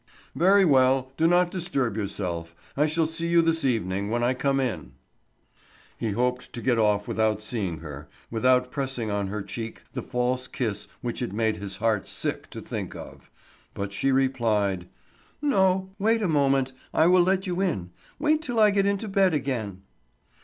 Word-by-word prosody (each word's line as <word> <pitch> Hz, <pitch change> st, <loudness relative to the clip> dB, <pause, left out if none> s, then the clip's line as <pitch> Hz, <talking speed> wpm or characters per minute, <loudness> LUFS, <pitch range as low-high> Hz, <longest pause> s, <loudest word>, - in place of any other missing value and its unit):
"Very 195 Hz, +3 st, +5 dB
well, 130 Hz, -3 st, +3 dB
do 160 Hz, +3 st, +3 dB
not 175 Hz, +1 st, +3 dB
disturb 140 Hz, -, -1 dB
yourself. 90 Hz, -6 st, -4 dB, 0.2 s
I 150 Hz, +2 st, +3 dB
shall 160 Hz, +1 st, +1 dB
see 165 Hz, +1 st, -2 dB
you 170 Hz, 0 st, +4 dB
this 165 Hz, -1 st, +1 dB
evening, 100 Hz, -6 st, 0 dB
when 120 Hz, +1 st, 0 dB
I 125 Hz, +2 st, +3 dB
come 135 Hz, +1 st, 0 dB
in." 90 Hz, -, -3 dB, 1.0 s
He 115 Hz, -, -3 dB
hoped 125 Hz, +3 st, -1 dB
to 120 Hz, -, -6 dB
get 120 Hz, -3 st, +2 dB
off 105 Hz, -2 st, +2 dB
without 110 Hz, -1 st, +1 dB
seeing 100 Hz, -7 st, -3 dB
her, 75 Hz, -2 st, -9 dB, 0.2 s
without 125 Hz, +2 st, +2 dB
pressing 130 Hz, -6 st, -3 dB
on 100 Hz, -1 st, -1 dB
her 100 Hz, +1 st, -4 dB
cheek 110 Hz, +3 st, -7 dB
the -, -, -3 dB
false 125 Hz, +1 st, -1 dB
kiss 110 Hz, -5 st, -3 dB
which 120 Hz, -1 st, -4 dB
it 120 Hz, -5 st, -3 dB
made 110 Hz, 0 st, 0 dB
his 100 Hz, -1 st, -6 dB
heart 110 Hz, -3 st, 0 dB
sick -, -, -3 dB
to -, -, -8 dB
think -, -, -5 dB
of. -, -, -11 dB, 0.5 s
But 100 Hz, 0 st, -4 dB
she 135 Hz, +7 st, +1 dB
replied: 110 Hz, -9 st, +1 dB, 0.5 s
"No. 190 Hz, -9 st, +2 dB
Wait 225 Hz, +2 st, +2 dB
a -, -, +2 dB
moment. 135 Hz, -4 st, +2 dB, 0.2 s
I 160 Hz, -, +5 dB
will 180 Hz, +1 st, +6 dB
let 190 Hz, +2 st, +2 dB
you 180 Hz, 0 st, -2 dB
in. 95 Hz, -, -1 dB, 0.3 s
Wait 305 Hz, +1 st, +2 dB
till 245 Hz, -7 st, -2 dB
I 210 Hz, -1 st, +6 dB
get 200 Hz, -1 st, +2 dB
into 200 Hz, +2 st, -1 dB
bed 195 Hz, -4 st, +3 dB
again." 110 Hz, -9 st, -3 dB
130 Hz, 175 wpm, -26 LUFS, 105-170 Hz, 1.0 s, will